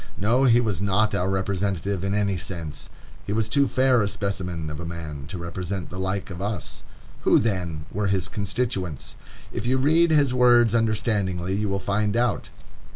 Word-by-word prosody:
No, 120 Hz, +6 st, +3 dB
he 120 Hz, -2 st, +6 dB
was 105 Hz, -7 st, -1 dB
not 100 Hz, +2 st, +2 dB
our 90 Hz, +2 st, 0 dB
representative 95 Hz, 0 st, -1 dB
in 100 Hz, +1 st, 0 dB
any 100 Hz, -2 st, +1 dB
sense. 85 Hz, -4 st, -6 dB, 0.4 s
He 100 Hz, -, -1 dB
was 110 Hz, 0 st, +1 dB
too 140 Hz, +5 st, +3 dB
fair 130 Hz, -2 st, +3 dB
a 100 Hz, -, +1 dB
specimen 95 Hz, -6 st, -3 dB
of 75 Hz, -, -6 dB
a -, -, -5 dB
man 80 Hz, -4 st, -6 dB
to 90 Hz, -, -5 dB
represent 90 Hz, +1 st, -5 dB
the 90 Hz, -, -6 dB
like 95 Hz, +1 st, -2 dB
of 90 Hz, +1 st, -6 dB
us. 100 Hz, -3 st, -3 dB, 0.4 s
Who, -, -, +5 dB
then, 90 Hz, -8 st, -1 dB
were 105 Hz, +1 st, -1 dB
his 95 Hz, -2 st, 0 dB
constituents? 100 Hz, -, -3 dB, 0.4 s
If 115 Hz, -, -4 dB
you 130 Hz, +1 st, +3 dB
read 160 Hz, +6 st, +4 dB
his 145 Hz, -5 st, +3 dB
words 120 Hz, -2 st, +5 dB
understandingly 105 Hz, -5 st, 0 dB
you 105 Hz, +1 st, 0 dB
will 100 Hz, -, 0 dB
find 105 Hz, +2 st, 0 dB
out. 120 Hz, 0 st, 0 dB
100 Hz, 180 wpm, -24 LUFS, 90-115 Hz, 0.4 s, he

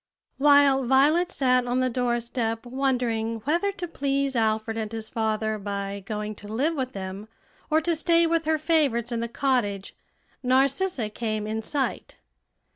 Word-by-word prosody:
While 285 Hz, -1 st, +5 dB
Violet 300 Hz, +8 st, +3 dB
sat 255 Hz, -4 st, +2 dB
on 245 Hz, +1 st, +1 dB
the 255 Hz, -, +2 dB
doorstep 240 Hz, -1 st, -1 dB
wondering 240 Hz, -4 st, -1 dB
whether 340 Hz, -, +1 dB
to 355 Hz, -2 st, -5 dB
please 275 Hz, -3 st, -1 dB
Alfred 220 Hz, -1 st, 0 dB
and 220 Hz, -1 st, -3 dB
his 220 Hz, -1 st, -6 dB
father 220 Hz, -1 st, -1 dB
by 200 Hz, 0 st, -4 dB
going 210 Hz, +1 st, -4 dB
to 205 Hz, -, -10 dB
live 265 Hz, +10 st, 0 dB
with 260 Hz, -4 st, -3 dB
them 195 Hz, +2 st, -6 dB, 0.4 s
or 315 Hz, 0 st, +3 dB
to 335 Hz, +1 st, 0 dB
stay 335 Hz, +1 st, +3 dB
with 330 Hz, -1 st, +1 dB
her 315 Hz, 0 st, +2 dB
favorites 295 Hz, -7 st, +1 dB
in 235 Hz, -, -1 dB
the 235 Hz, -, -2 dB
cottage, 235 Hz, -6 st, -1 dB, 0.5 s
Narcissa 270 Hz, -, +1 dB
came 215 Hz, -1 st, -3 dB
in 220 Hz, +1 st, -3 dB
sight. 270 Hz, +4 st, -3 dB
245 Hz, 155 wpm, -25 LUFS, 220-285 Hz, 0.5 s, While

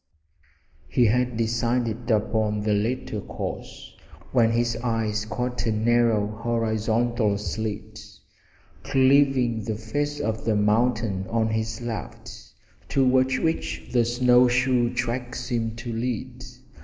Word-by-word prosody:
He 125 Hz, -, +3 dB
had 125 Hz, +1 st, +1 dB
decided 115 Hz, 0 st, -1 dB
upon 105 Hz, -1 st, +1 dB
the 105 Hz, 0 st, +1 dB
latter 110 Hz, 0 st, -1 dB
course -, -, -7 dB, 0.4 s
when 120 Hz, -3 st, +4 dB
his 120 Hz, 0 st, +1 dB
eyes 110 Hz, -3 st, -1 dB
caught 125 Hz, +2 st, -3 dB
a -, -, +2 dB
narrow 115 Hz, -1 st, +2 dB
horizontal 110 Hz, 0 st, 0 dB
slit 105 Hz, +1 st, -5 dB, 0.8 s
cleaving 130 Hz, -4 st, +3 dB
the 110 Hz, -, -2 dB
face 145 Hz, +7 st, -3 dB
of 110 Hz, 0 st, -2 dB
the 110 Hz, -1 st, +1 dB
mountain 105 Hz, -2 st, +1 dB
on 115 Hz, -1 st, +1 dB
his 110 Hz, +1 st, -2 dB
left, 115 Hz, -3 st, -6 dB, 0.6 s
toward 130 Hz, -1 st, +3 dB
which 160 Hz, 0 st, -2 dB
the 120 Hz, -2 st, +3 dB
snow 125 Hz, +1 st, +4 dB
shoe 125 Hz, -1 st, +2 dB
tracks 120 Hz, 0 st, -3 dB
seemed 115 Hz, -2 st, -2 dB
to 120 Hz, 0 st, -5 dB
lead. 125 Hz, +2 st, -4 dB
115 Hz, 120 wpm, -25 LUFS, 110-125 Hz, 0.8 s, when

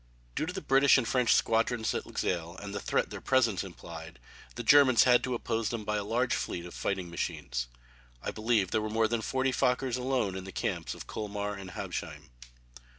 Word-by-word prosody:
Due 155 Hz, -, -2 dB
to 180 Hz, -, -3 dB
the 190 Hz, -, -4 dB
British 135 Hz, +1 st, +5 dB
and 125 Hz, -4 st, 0 dB
French 125 Hz, -1 st, +2 dB
squadrons 115 Hz, 0 st, +2 dB
at -, -, -3 dB
Luxeuil, 85 Hz, 0 st, -2 dB
and 100 Hz, 0 st, -7 dB
the 100 Hz, -, -2 dB
threat -, -, 0 dB
their -, -, -6 dB
presence 115 Hz, -8 st, +2 dB
implied, 80 Hz, -4 st, -9 dB, 0.4 s
the 120 Hz, -, -4 dB
Germans 130 Hz, -1 st, +7 dB
had 125 Hz, -1 st, +5 dB
to 130 Hz, -1 st, -1 dB
oppose 115 Hz, -1 st, -1 dB
them 115 Hz, -3 st, -4 dB
by 105 Hz, 0 st, 0 dB
a 105 Hz, -, -2 dB
large 120 Hz, +5 st, 0 dB
fleet 85 Hz, -, -3 dB
of 90 Hz, -, -9 dB
fighting 95 Hz, -3 st, -3 dB
machines. -, -, -3 dB, 0.5 s
I -, -, -4 dB
believe 110 Hz, -3 st, +1 dB
there 110 Hz, -, +1 dB
were 110 Hz, -, -3 dB
more 110 Hz, +1 st, +2 dB
than 115 Hz, 0 st, -1 dB
forty 130 Hz, +3 st, 0 dB
Fokkers 125 Hz, 0 st, +1 dB
alone 125 Hz, -7 st, 0 dB
in 95 Hz, -, -5 dB
the 95 Hz, -, -8 dB
camps -, -, -3 dB
of -, -, -9 dB
Colmar 105 Hz, -1 st, -4 dB
and 95 Hz, -2 st, -8 dB
Habsheim. -, -, -6 dB
110 Hz, 205 wpm, -30 LUFS, 95-125 Hz, 0.5 s, Germans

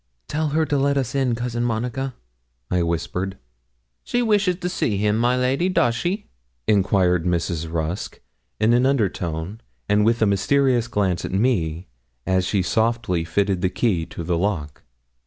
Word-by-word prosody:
'Tell 155 Hz, 0 st, -1 dB
her 155 Hz, +2 st, +1 dB
to 145 Hz, -2 st, 0 dB
let 140 Hz, +1 st, +2 dB
us 130 Hz, -4 st, -1 dB
in, 130 Hz, -4 st, +1 dB
Cousin 120 Hz, 0 st, -2 dB
Monica,' 120 Hz, +3 st, -2 dB, 0.6 s
I 90 Hz, -, +2 dB
whispered. 85 Hz, +3 st, -2 dB, 0.7 s
'She 245 Hz, 0 st, 0 dB
wishes 205 Hz, -5 st, +2 dB
to 180 Hz, 0 st, -4 dB
see 115 Hz, -, -1 dB
him, 105 Hz, +1 st, +1 dB
my 120 Hz, +3 st, +2 dB
lady 135 Hz, +8 st, +1 dB
does 120 Hz, -10 st, +2 dB
she?' 185 Hz, -, -2 dB, 0.4 s
enquired 95 Hz, -4 st, +3 dB
Mrs. 85 Hz, -2 st, -1 dB
Rusk, 85 Hz, +3 st, -3 dB, 0.4 s
in 110 Hz, +2 st, +4 dB
an 125 Hz, +2 st, +4 dB
under 130 Hz, -8 st, +2 dB
tone, 85 Hz, +5 st, -5 dB, 0.3 s
and 105 Hz, +1 st, +3 dB
with 115 Hz, +2 st, +2 dB
a -, -, +5 dB
mysterious 120 Hz, +4 st, +2 dB
glance 100 Hz, -6 st, 0 dB
at -, -, -4 dB
me, 95 Hz, -6 st, 0 dB, 0.4 s
as 95 Hz, 0 st, +1 dB
she 100 Hz, -1 st, +1 dB
softly 110 Hz, -4 st, 0 dB
fitted 95 Hz, +2 st, 0 dB
the 95 Hz, -, +2 dB
key 90 Hz, -4 st, 0 dB
to 85 Hz, -, -7 dB
the 85 Hz, 0 st, 0 dB
lock. 85 Hz, -7 st, -2 dB
110 Hz, 165 wpm, -22 LUFS, 90-125 Hz, 0.7 s, a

